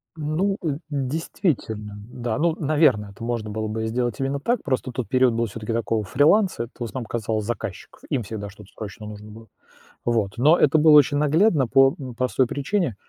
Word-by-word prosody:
Ну, 165 +6 -1
э, 150 -4 -1
действительно, 130 - -2 0.2
да, 120 -2 -3
ну, 165 0 +2
наверное, 145 -9 +2
это 100 +3 -11
можно 115 -2 -3
было 110 +1 -3
бы 110 +1 -3
сделать 120 0 -2
именно 135 +1 -1
так, 235 - -1
просто 130 -2 -2
тот 125 -1 -4
период 130 -2 +3
был 115 +1 0
всё-таки 110 +1 -5
такого 115 -1 -1
фриланса, 160 - +3
это 120 - -10
в - - -3
основном 120 +1 -5
казалось 110 -1 -2
заказчиков, 115 -4 -6
им 130 -4 -1
всегда 105 -1 -6
что-то 100 0 -15
срочно 105 0 -8
нужно 105 0 -9
было. 110 +1 -13 0.6
Вот, 110 -5 0
но 150 +8 +5
это 150 +2 +4
было 155 +1 +6
очень 145 0 +4
наглядно 150 - +3
по, 135 +2 +5
м, 130 -3 -7
простой 125 +1 +1
причине, 140 - -1
125 Hz, 190 wpm, -23 LUFS, 110-145 Hz, 0.6 s, было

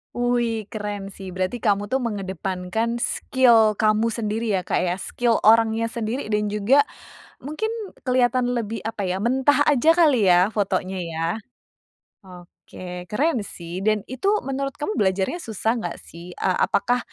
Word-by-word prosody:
Wuih 240 -2 0
keren 205 -2 -5
sih, 190 -2 -9
berarti 185 +6 -2
kamu 205 -2 0
tuh 265 - +2
mengedepankan 195 0 -3
skill 235 -3 +3
kamu 215 +2 +2
sendiri 220 -1 -1
ya, 185 - -1
Kak, - - 0
ya, 180 0 0
skill 235 +4 0
orangnya 225 +1 +4
sendiri 230 +1 -3
dan 210 0 +1
juga 220 +8 +3 0.5
mungkin 310 +11 -3 0.3
kelihatan 250 -1 +2
lebih, 230 -2 -3
apa 215 -3 -3
ya, 185 +1 -1
mentah 265 +4 +3
aja 300 +3 +4
kali 290 - +4
ya 180 +3 +5
fotonya 190 -2 -1
ya? 165 -1 -3 1.0
Oke, 180 0 -10
keren 280 - 0
sih 170 +1 -7
dan 210 +1 +1
itu 320 +10 -3 0.2
menurut 275 +1 -3
kamu 365 +8 -3
belajarnya 190 - 0
susah 225 - -2
nggak 175 -5 -5
sih? 175 +2 -11
E - - -2
apakah, 245 +4 +2
220 Hz, 145 wpm, -23 LUFS, 190-245 Hz, 1.0 s, ya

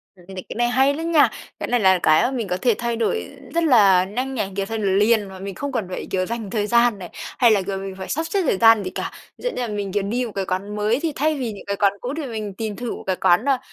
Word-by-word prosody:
Cái 180 - -19
n 190 - -9
cái 185 - -7
này 240 +1 +2
hay 265 +3 +3
lắm 325 +3 -3
nha, 315 -3 +5 0.3
cái - - -3
này 245 - +2
là 190 -3 +4
cái 155 0 +5
mà 255 - +1
mình 240 -6 -3
có 180 0 -1
thể 240 +4 +2
thay 235 0 -2
đổi 235 - -1 0.2
rất 335 - +2
là 205 - +5
nhanh 250 +8 -4
này, 205 -5 -2
kiểu, 195 0 -1
thay 225 +3 -4
đổi 210 -2 -1
liền 210 +3 +3
mà 190 -1 -10
mình 195 0 -6
không 285 0 -4
cần 230 -6 -2
phải, 185 - -5
kiểu, 185 -1 0
dành 225 -1 -5
thời 210 0 -1
gian 235 -2 +3
này 180 - -8
hay 240 -3 +1
là, 205 -2 +3
kiểu, 195 +1 -4
mình 195 0 -6
phải 190 - -7
sắp 320 - -1
xếp 395 +3 +1
thời 270 - +1
gian 225 0 +6
gì 185 - -3
cả. - - -5 0.3
Ví - - -16
dụ - - +1
như 250 - -4
là 240 - -1
mình, 205 -2 -4
kiểu, 205 +1 0
đi 240 +5 -1
một 230 - -6
cái 195 -1 -1
quán 195 +3 -3
mới 210 +4 +1
thì 325 +1 -1
thay 310 +3 +1
vì 250 -4 -3
những 205 - -10
cái 200 - -1
quán 200 -1 +2
cũ 250 +2 -4
thì 315 - -3
mình 215 -5 -5
tìm 215 +1 -4
thử 245 +1 -4
một - - -10
cái 190 - +1
quán 180 +6 +3
nào, 275 -2 +3
215 Hz, 315 wpm, -22 LUFS, 195-245 Hz, 0.3 s, gian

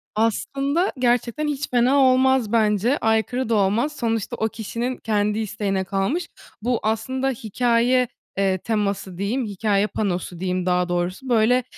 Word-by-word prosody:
Aslında 275 - 0
gerçekten 245 +4 +1
hiç 285 -1 -3
fena 250 +3 +3
olmaz 260 -3 +4
bence, 220 +3 +2
aykırı 225 +3 0
da 230 - +2
olmaz. 215 +9 +1
Sonuçta 225 -2 -2
o 220 - 0
kişinin 235 +4 -4
kendi 210 -1 0
isteğine 200 -3 -2
kalmış. 195 - -1 0.3
Bu 240 +1 0
aslında 240 +5 -1
hikâye, 245 +1 +1 0.3
eee, 195 -1 +2
teması 200 -3 -2
diyeyim, 225 +7 -1
hikâye 205 0 0
panosu 180 -5 -3
diyeyim 185 0 -1
daha 180 -1 +1
doğrusu, 175 +8 -2
böyle, 240 +2 +3
225 Hz, 140 wpm, -22 LUFS, 200-255 Hz, 0.3 s, olmaz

